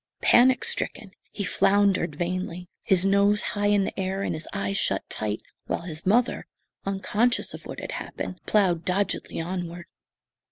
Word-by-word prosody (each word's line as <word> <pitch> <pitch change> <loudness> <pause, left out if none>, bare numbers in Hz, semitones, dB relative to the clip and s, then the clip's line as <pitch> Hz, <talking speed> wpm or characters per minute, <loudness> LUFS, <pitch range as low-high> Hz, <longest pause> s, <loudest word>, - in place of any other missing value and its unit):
Panic 255 +1 +6
stricken, 195 - -2 0.2
he 205 - -4
floundered 195 -4 +2
vainly, 180 +1 -3
his 190 -1 +3
nose 200 +1 +4
high 205 0 +1
in 205 -1 +4
the 195 - -4
air 190 +1 -1
and - - -1
his 155 0 -5
eyes 100 0 -2
shut - - 0
tight, 105 0 -3 0.2
while - - -2
his 170 0 -7
mother, 240 +5 +2 0.4
unconscious 210 +5 +1
of - - -9
what - - -6
had - - -6
happened, 180 - -5
ploughed 185 -6 +3
doggedly 190 0 -1
onward. 175 0 -4
190 Hz, 155 wpm, -26 LUFS, 175-205 Hz, 0.4 s, Panic